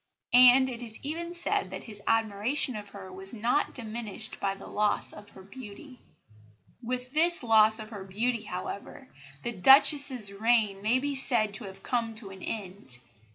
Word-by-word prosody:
And 250 +1 +7
it 245 -2 -7
is 225 -2 -6
even 335 +4 -4
said 345 - -1
that 190 0 -8
his 210 -3 -9
admiration 225 +4 0
of 205 -1 -7
her 190 -2 -11
was 190 +4 -3
not 235 +6 -1
diminished 220 -2 -7
by 195 0 -2
the - - -13
loss 210 0 -1
of 205 -1 -13
her 190 - -15
beauty. 250 +5 -12 0.8
With 250 +1 -5
this 335 0 +3
loss 220 -1 +4
of 215 -1 -9
her 200 -3 -8
beauty, 225 +5 -2
however, 205 +7 -8 0.4
the 240 - -3
Duchess's 265 - +5
reign 215 -2 +1
may 220 +5 +2
be 285 +2 -3
said 240 -6 +4
to 220 +1 -5
have 195 0 -11
come 230 -3 -2
to 210 -3 -1
an 190 -1 -12
end. 190 - -1
225 Hz, 170 wpm, -27 LUFS, 200-255 Hz, 0.8 s, And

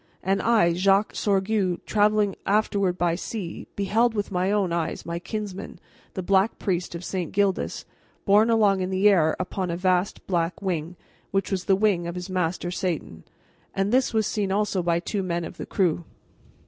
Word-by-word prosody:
And 195 +1 +1
I, 220 -7 +3
Jacques 195 +3 +2
Sorgue, 195 -2 0
traveling 210 -1 +2
afterward 200 -3 +1
by 175 -2 +1
sea, 180 0 -5
beheld 220 +4 +1
with 205 -1 -2
my 185 +1 0
own 200 -4 +1
eyes 170 -2 -2
my 170 0 -3
kinsman, 205 0 -6 0.4
the 185 - -3
Black 195 +3 +2
Priest 180 -3 -2
of 170 +1 -6
St. 180 -4 -3
Gildas, 200 -2 0 0.4
borne 210 +3 +5
along 205 -4 +3
in 185 - -1
the 190 +2 +3
air 165 -6 +4
upon 185 0 -3
a 170 - -2
vast 185 +1 0
black 170 -2 -1
wing, 175 -3 -3 0.3
which 195 +1 -1
was 185 -2 -1
the 195 - +4
wing 190 -4 +1
of 170 - -5
his 180 +1 -6
master 175 -1 -1
Satan. 170 - -4 0.5
And 195 +1 0
this 260 +1 +3
was 220 -2 +1
seen 200 -2 -1
also 205 -1 +1
by 170 -1 +1
two 195 +3 -3
men 175 -2 -2
of - - -9
the - - -6
crew." 175 -3 +1
190 Hz, 180 wpm, -25 LUFS, 175-205 Hz, 0.5 s, borne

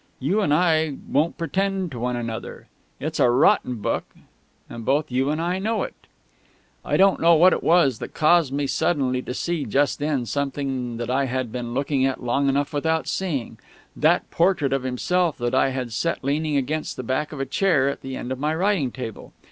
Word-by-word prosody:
You 180 +11 +1
and 170 - +1
I 160 -2 +2
won't 155 +4 +1
pretend 190 +2 -1
to 125 - -6
one 125 +1 -1
another. 115 -2 -6 0.3
It's 155 +2 -4
a 125 -3 +5
rotten 125 0 +3
book, 105 - -2 0.6
and 115 - -8
both 145 +4 0
you 130 +2 +1
and 155 +1 -1
I 175 +3 -1
know 220 +3 -1
it...." - - -6 0.9
I - - 0
don't 195 0 +4
know 170 0 +5
what 180 +4 +6
it - - -1
was 160 -9 +3
that - - -8
caused 155 -2 +4
me 140 +1 -1
suddenly 135 -3 0
to 125 - -6
see 170 -1 -2
just 140 +6 +1
then 145 -4 -1
something 135 -1 -3
that 120 +1 -3
I 135 +2 +1
had 130 -2 -3
been 120 -1 -5
looking 140 0 0
at 135 -1 -1
long 135 +3 +1
enough 140 +2 0
without 160 +2 0
seeing 150 -11 -3 0.4
that - - +2
portrait 165 -6 +2
of 135 - 0
himself 160 +7 0
that 120 +1 -2
I 130 +1 +3
had 130 -3 -4
set 165 +8 -1
leaning 150 +2 0
against 150 +3 -2
the 130 - -4
back 130 +5 -2
of 150 - -7
a 135 - -1
chair 155 -5 +2
at 140 - -3
the 135 0 -6
end 125 - -5
of 130 - -3
my 150 +2 0
writing 185 -6 +1
table. 115 -4 -8
140 Hz, 205 wpm, -23 LUFS, 130-160 Hz, 0.9 s, what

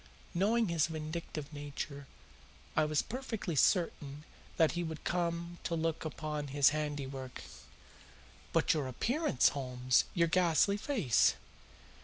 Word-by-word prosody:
Knowing 210 +4 +2
his 165 -2 +2
vindictive 155 -1 -5
nature, 145 -1 -6 0.7
I 155 - +4
was 150 -1 +1
perfectly 225 - -4
certain 150 -3 +1 0.3
that 160 -2 +4
he 175 0 -2
would 160 -2 -6
come 170 0 -2
to 170 - 0
look 165 0 -1
upon 150 -1 -4
his 140 0 +5
handiwork." 140 -3 -4 1.1
"But - - +3
your 150 -4 -1
appearance, 230 - +2
Holmes 125 -2 +1
your 170 -2 +3
ghastly 180 +3 +3
face?" 205 - +2
155 Hz, 120 wpm, -33 LUFS, 145-175 Hz, 1.1 s, his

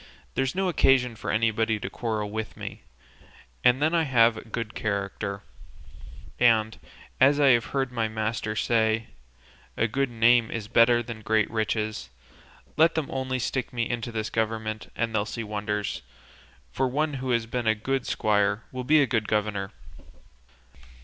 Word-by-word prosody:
So - - -20 0.3
there's 135 +2 -1
no 190 0 0
occasion 130 -7 +3
for - - -6
anybody 110 0 +1
to 95 - -5
quarrel 105 0 -3
with 110 -1 -5
me; - - -7 0.8
and 125 +3 +4
then 155 +2 +2
I 170 - +3
have 115 -4 +4
a - - -8
good 115 0 -5
character, 100 -1 -3 1.0
and, 110 -2 +3 0.4
as 140 +2 +5
I 140 -2 +5
have 120 -2 +4
heard 135 -2 -2
my 115 -2 -1
master 110 0 -3
say, 110 -1 +1 0.7
'a 110 - +2
good 135 +4 -1
name 120 0 +4
is 110 -2 -5
better 120 +1 +4
than 115 -2 -8
great 110 0 +1
riches;' 110 - -2 0.7
let 165 +2 +4
them 160 -3 -2
only 130 -1 -2
stick 130 +1 -2
me 120 -2 -1
into 120 -1 -3
this 110 -1 -3
government 110 -1 -2
and 115 0 -2
they'll 105 -2 +1
see 115 +2 -5
wonders, 105 -1 -3 0.7
for 130 - 0
one 150 +4 -1
who 130 - -3
has 120 -2 +1
been 120 0 -3
a 110 - +4
good 130 +4 -2
squire 105 +1 +1
will 130 0 -5
be 150 +3 +5
a - - +3
good 110 -4 -1
governor." 105 -2 -1
115 Hz, 165 wpm, -26 LUFS, 110-125 Hz, 1.0 s, as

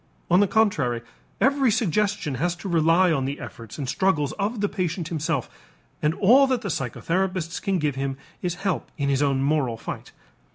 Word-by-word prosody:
On 180 - +6
the 205 - +4
contrary, 150 - +1 0.4
every 275 -1 +3
suggestion 205 - 0
has 175 0 +1
to 195 - -8
rely 170 +1 +4
on 135 -4 +1
the 140 +2 -3
efforts 115 -3 -9
and 140 -3 -4
struggles 150 -3 +1
of 210 +3 -1
the 205 - +1
patient 180 -3 -3
himself 160 -5 -1 0.5
and 150 +2 +1
all 255 +7 +6
that 255 -3 0
the 200 - -4
psychotherapists 170 +5 -2
can 195 -1 0
give 150 -3 0
him 135 0 -3 0.2
is 175 -1 -2
help 190 -3 -1
in 140 -2 0
his 135 0 +1
own 135 -2 +2
moral 140 -5 +1
fight. - - -7
170 Hz, 180 wpm, -24 LUFS, 140-195 Hz, 0.5 s, On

